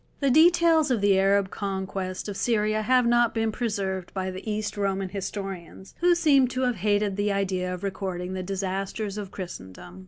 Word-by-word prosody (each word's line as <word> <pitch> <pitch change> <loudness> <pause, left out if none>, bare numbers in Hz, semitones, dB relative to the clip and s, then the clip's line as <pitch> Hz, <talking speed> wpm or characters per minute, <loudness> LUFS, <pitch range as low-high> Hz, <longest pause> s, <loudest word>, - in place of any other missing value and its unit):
The 275 -2 +2
details 330 0 +5
of 245 -4 +1
the 200 -1 +3
Arab 195 0 +2
conquest 190 -2 -4
of 205 - -5
Syria 215 -1 +1
have 250 +2 +3
not 240 -1 +3
been 225 -1 0
preserved 200 -6 -3
by 190 0 -2
the 185 +4 -7
East 210 0 -3
Roman 195 -2 -1
historians, 195 -2 -6
who 350 0 +4
seem 285 -6 +4
to 255 +1 -3
have 250 -3 0
hated 205 0 0
the 205 0 +1
idea 185 -2 -1
of 180 +1 -6
recording 185 -2 -4
the 190 - -3
disasters 195 +2 -3
of 200 -2 -6
Christendom. 95 - -9
200 Hz, 180 wpm, -26 LUFS, 190-225 Hz, -, details